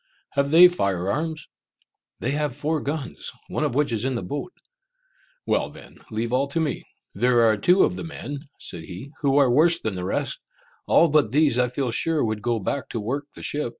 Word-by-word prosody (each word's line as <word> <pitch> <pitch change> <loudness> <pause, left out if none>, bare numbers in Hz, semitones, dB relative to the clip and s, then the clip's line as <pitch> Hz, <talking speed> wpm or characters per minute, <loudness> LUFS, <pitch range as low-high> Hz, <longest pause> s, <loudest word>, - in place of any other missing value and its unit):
"Have 140 0 +1
they 170 +4 +9
fire 100 - -1
arms?" 155 +2 -3 0.7
"They 125 - 0
have 145 -3 -1
four 150 +2 -1
guns, 145 -1 -4 0.2
one - - -2
of 145 -5 -1
which 145 -2 +1
is 110 -1 -1
in 130 0 -1
the 115 - -3
boat." 145 - -5 0.9
"Well - - +1
then, - - -14
leave 115 +2 -3
all 135 +2 +2
to 140 +4 -2
me!" 160 -2 -1 0.3
"There 120 +3 +3
are 110 -1 +4
two 180 - +4
of 180 - 0
the - - -5
men," 145 -3 -6 0.2
said 80 -2 -6
he, 95 +11 -9
"who 140 -1 +2
are 135 -4 +5
worse 165 +6 +4
than 110 - -3
the 90 -1 -5
rest. 100 - -2 0.5
All 170 - +5
but 145 -6 +3
these 140 -1 +3
I 125 - +3
feel 125 0 -2
sure 160 +3 +1
would 110 -1 -2
go 120 +1 0
back 115 +6 -3
to 115 - -3
work 135 +7 -3
the - - -10
ship." 145 -4 -1
140 Hz, 210 wpm, -24 LUFS, 115-150 Hz, 0.9 s, they